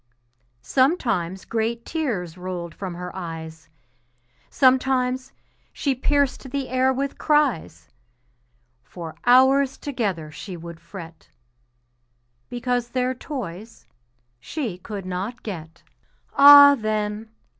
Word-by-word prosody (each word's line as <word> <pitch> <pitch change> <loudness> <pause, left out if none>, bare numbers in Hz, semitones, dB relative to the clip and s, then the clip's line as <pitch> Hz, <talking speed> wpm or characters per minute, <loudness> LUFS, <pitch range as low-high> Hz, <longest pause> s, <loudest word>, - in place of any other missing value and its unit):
Sometimes 225 - 0
great 230 +1 -2
tears 220 - -3
rolled 180 -2 -6
from 185 -3 -6
her 180 +1 -7
eyes, 160 -3 -8 0.8
Sometimes 255 -1 +2 0.4
she 280 - -1
pierced 275 0 0
the 275 0 -3
air 255 +1 +2
with 270 +1 -3
cries, 215 - +1 0.9
For 165 +4 -9
hours 265 +2 +5
together 200 - -3
she 180 +4 -8
would 170 0 -10
fret 165 -1 -11 1.2
Because 245 0 -2
their 255 0 0
toys 225 - -8 0.5
she 220 - -5
could 200 0 -7
not 190 +7 -5
get. 165 -6 -8 0.5
Ah, 285 0 +10
then! 215 -2 -2
225 Hz, 100 wpm, -23 LUFS, 175-260 Hz, 1.2 s, Ah